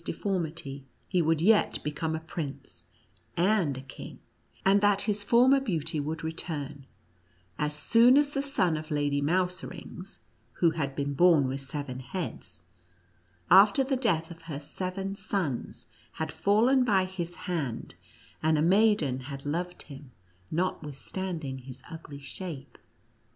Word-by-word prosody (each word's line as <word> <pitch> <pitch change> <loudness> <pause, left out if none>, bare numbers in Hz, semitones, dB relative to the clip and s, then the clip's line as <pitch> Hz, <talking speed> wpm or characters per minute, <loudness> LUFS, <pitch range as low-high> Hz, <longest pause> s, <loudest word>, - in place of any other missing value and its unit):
deformity, 160 -9 -3 0.2
he 180 -2 +2
would 160 -1 +2
yet 205 +5 +4
become 155 +2 -2
a - - -3
prince 160 -3 -7 0.5
and 175 -6 +2
a - - -6
king; 135 - -10 0.5
and 195 +1 +5
that 205 -1 +3
his 205 0 0
former 245 +6 +5
beauty 165 - -1
would 155 +2 -3
return, 145 -4 -5 0.7
as 150 0 0
soon 235 - +5
as 290 0 +3
the 275 - 0
son 190 - +1
of 155 0 -6
Lady 145 -1 0
Mouserings, 180 +2 -2 0.4
who 170 +4 +3
had 140 -4 -3
been 140 0 -2
born 160 -3 +5
with 135 +1 -3
seven 135 -1 -5
heads, 130 - -6 0.9
after 200 +7 +7
the 265 +1 0
death 175 -11 0
of 165 -1 -11
her 155 -4 -5
seven 185 +6 -4
sons, 190 - -3 0.3
had 160 -1 -3
fallen 215 - +3
by 195 -6 +3
his 175 -2 -5
hand, 150 -10 -3 0.5
and 160 0 +3
a - - +2
maiden 185 - +3
had 140 +1 -8
loved 175 +4 -3
him, 140 -2 -11 0.4
notwithstanding 160 -2 -3
his 130 0 -11
ugly 155 -3 -9
shape. 145 +1 -8
165 Hz, 140 wpm, -29 LUFS, 145-195 Hz, 0.9 s, after